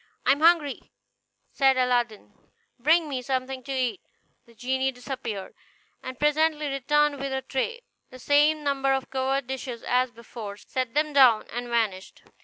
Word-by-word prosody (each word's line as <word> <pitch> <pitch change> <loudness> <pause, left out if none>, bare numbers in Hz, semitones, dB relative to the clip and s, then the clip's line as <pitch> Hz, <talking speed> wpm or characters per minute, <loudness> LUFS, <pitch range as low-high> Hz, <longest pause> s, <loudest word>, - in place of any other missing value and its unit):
"I - - +5
am 280 - +2
hungry," 320 -3 +2 0.6
said 270 -1 +3
Aladdin; 245 -4 0 0.5
"bring 315 +5 +3
me 265 -3 -3
something 260 0 -3
to 275 - -6
eat." 260 +4 -1 0.5
The 235 - -20
genie 260 +3 -1
disappeared, 245 -6 -6 0.5
and 255 -1 -7
presently 300 0 +1
returned 290 +1 +1
with 275 0 -3
a 265 0 -2
tray, 465 - -3 0.3
the 255 - -12
same 295 +3 +3
number 275 -1 +1
of 265 0 -3
covered 265 +1 -1
dishes 255 -2 -6
as 250 +1 +2
before, 225 -3 -9
set 255 +3 -4
them 300 0 +1
down, 255 -6 +6
and 245 +1 -4
vanished. 220 -6 -2
265 Hz, 155 wpm, -26 LUFS, 245-285 Hz, 0.6 s, down